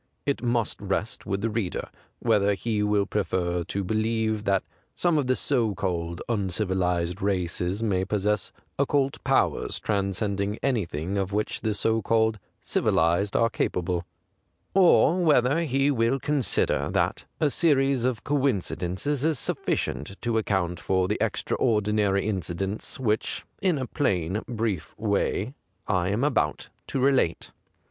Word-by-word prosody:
It 140 - 0
must 120 -3 0
rest 100 +2 -3
with 100 0 -1
the 115 - 0
reader 105 -5 -3 0.3
whether 100 0 +2
he 110 +1 -1
will 105 -1 +2
prefer 90 -4 -1
to 100 - -2
believe 110 +1 0
that 95 -1 +2 0.3
some 170 -3 +2
of 135 - -1
the 130 - +3
so 115 -8 +1
called 85 -2 -3
uncivilized 95 -4 0
i 100 - +3
aces 90 +3 -2
may 95 -4 +1
possess 105 0 0 0.3
occult 140 -1 +1
powers - - +1
transcending 100 0 -1
anything 100 - -1
of 95 0 -2
which 105 +1 -1
the 110 -2 -1
so 115 +1 +1
called 110 -1 +2 0.2
civilized 85 +5 +1
are 115 0 +3
capable, 90 -4 -1 0.7
or 180 -2 +5
whether 145 -2 +4
he 140 -3 +2
will 120 +1 +1
consider 145 -2 +1
that - - 0
a 150 -2 +2
series 135 -6 +2
of 125 -3 -1
coincidences 135 -1 0
is 160 -2 +2
suffi - - 0
cient 75 +10 -4
to 115 -2 +1
account 95 -5 -1
for 95 -1 +1
the 105 - -1
extraordi 105 -3 +1
nary 100 -2 +2
incidents 95 - -3
which, 110 -4 -1 0.2
in 185 -5 +2
a 130 - -2
plain 95 - 0
brief 110 -8 -3
way, 105 +2 0 0.3
I 90 -3 +1
am 105 +6 0
about 110 - 0 0.2
to 135 - -2
relate. 130 -10 +2
105 Hz, 140 wpm, -26 LUFS, 95-125 Hz, 0.7 s, or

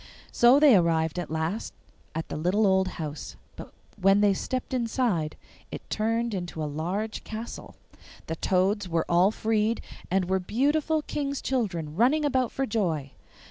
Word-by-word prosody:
So 245 +4 +6
they 290 -6 +7
arrived 165 -2 +2
at 175 - -5
last 160 +7 -3 0.4
at 160 - -3
the - - -4
little 180 +7 +1
old 190 -1 +3
house, 155 -3 -6 0.2
but - - -10 0.3
when 195 +2 +5
they 205 -1 +4
stepped 255 +7 -4
inside 230 - 0 0.4
it - - -8
turned 230 +1 0
into 175 -4 -4
a - - -1
large 180 +9 -3
castle. 225 +2 -7 0.5
The 160 - -4
toads 190 +3 +1
were 165 -1 0
all 175 +3 +4
freed, 220 +1 0 0.3
and 190 0 +1
were 190 +1 +1
beautiful 295 - +1
King's 280 -2 -3
children, 175 - -2
running 270 - +3
about 260 -4 +1
for 270 - -1
joy. 170 - -1
200 Hz, 155 wpm, -27 LUFS, 170-235 Hz, 0.5 s, they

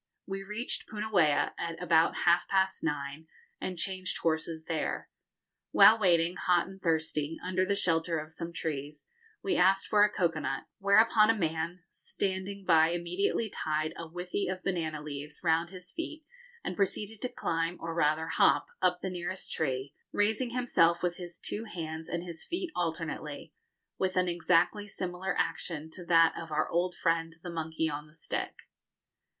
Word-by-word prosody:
We 195 0 -4
reached 210 +5 -3
Punauia 185 -9 +2
at 165 -1 -3
about 165 -2 +4
half 175 0 +4
past 190 0 +1
nine, 150 0 -3 0.3
and 185 -1 -4
changed 185 +1 -2
horses 160 0 -1
there. 160 -2 -2 0.6
While 225 +1 +8
waiting, 175 -3 +3
hot 175 -1 +3
and 190 0 -12
thirsty, 160 -2 0
under 185 0 +1
the 200 - +2
shelter 165 -3 +1
of 155 +1 -6
some 170 +1 -5
trees, 150 -2 -4 0.4
we 385 -2 +1
asked 195 +1 +4
for 210 -1 +5
a 210 - +5
cocoa 170 -6 0
nut, - - -2 0.2
whereupon 215 +2 +5
a 225 - +4
man 165 0 -2
standing 195 0 -3
by 160 -2 +6
immediately 180 +6 0
tied 155 -5 -2
a 165 - -6
withy 180 +4 -3
of 185 0 -3
banana 160 -5 -2
leaves 150 0 -7
round 165 0 +2
his 180 -1 -9
feet 320 -2 -6 0.4
and - - -3
proceeded 205 +2 -1
to 250 - -1
climb, 165 -7 -1
or 165 0 -4
rather 155 0 +2
hop, 165 - +3
up 180 -1 +2
the 190 - -1
nearest 180 +1 -4
tree, 135 -2 -2 0.2
raising 220 +4 +1
himself 210 -9 +2
with 175 -1 0
his 175 -1 -8
two 220 +2 -4
hands 160 -5 -5
and 170 0 -2
his 170 -2 -8
feet 355 -1 -3
alternately, 160 -2 -3 0.5
with 185 -1 0
an 180 0 +3
exactly 175 +4 +2
similar 185 -1 -3
action 160 -2 -2
to 180 - -8
that 165 -1 +5
of 165 -1 -7
our 150 - +1
old 180 +1 0
friend 165 -1 0
the 175 - -5
monkey 160 -1 -1
on 150 0 -4
the 150 - -20
stick. 165 - -4
175 Hz, 165 wpm, -30 LUFS, 160-190 Hz, 0.6 s, While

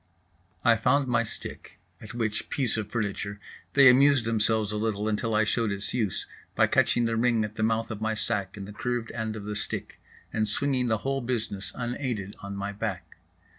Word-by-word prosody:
I 115 -1 +6
found 130 +4 +2
my 115 -2 +3
stick, 115 - -8 0.2
at 115 +2 -9
which 110 -3 -2
"piece 130 -6 0
of 110 -2 -3
furniture" 100 -2 -3 0.3
they 140 -1 +8
amused 135 -1 +6
themselves 110 -1 +2
a 105 - -2
little 105 -1 -1
until 110 +1 0
I 105 - +4
showed 110 0 +1
its 100 +1 -2
use, 110 -7 -1 0.3
by - - +5
catching 120 - +3
the 115 0 0
ring 115 -1 +3
at 105 0 -4
the 110 - -5
mouth 110 0 +1
of 110 -1 -5
my 110 0 0
sack 100 -2 -1
in 100 - -6
the 105 - -9
curved 120 +1 -2
end 110 -2 -3
of 105 -2 -7
the 105 0 -3
stick 105 - -5 0.3
and 110 -1 +1
swinging 130 +3 +1
the 110 -1 +2
whole 135 0 0
business 115 -5 -3
unaided 120 -5 -3
on 100 0 -6
my 100 +1 -3
back. 100 -6 -5
110 Hz, 200 wpm, -27 LUFS, 105-120 Hz, 0.3 s, they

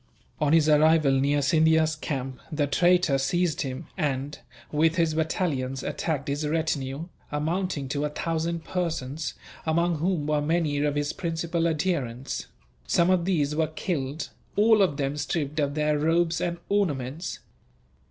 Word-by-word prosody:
On 150 -2 +2
his 160 -1 +5
arrival 155 -1 +5
near 140 +2 +2
Scindia's 160 +1 +3
camp 135 -4 -4
the 150 -2 +1
traitor 175 -1 +3
seized 175 +3 0
him 130 -2 -4
and, 145 -3 -2 0.3
with 160 +2 +3
his 165 -2 +2
battalions, 145 -5 -1
attacked 155 -3 -2
his 145 +2 -1
retinue, 150 -2 -1 0.3
amounting 160 0 -1
to 145 +1 -1
about 150 0 -5
a - - -3
thousand 165 0 -1
persons, 160 -4 -3 0.3
among 170 0 +1
whom 170 -2 0
were 150 0 +1
many 155 -1 +1
of 145 0 +1
his 145 0 -1
principal 170 0 -1
adherents. 150 -7 -2 0.4
Some 170 - +3
of 180 -2 +2
these 150 -6 +1
were 160 0 +2
killed, 150 -3 -3 0.3
all 215 0 +5
of 175 -8 +2
them 140 +1 -1
stripped 150 0 -2
of 145 -1 0
their 150 -1 +1
robes 165 +2 +2
and 170 0 -1
ornaments. 160 -6 -1
155 Hz, 150 wpm, -26 LUFS, 145-170 Hz, 0.4 s, his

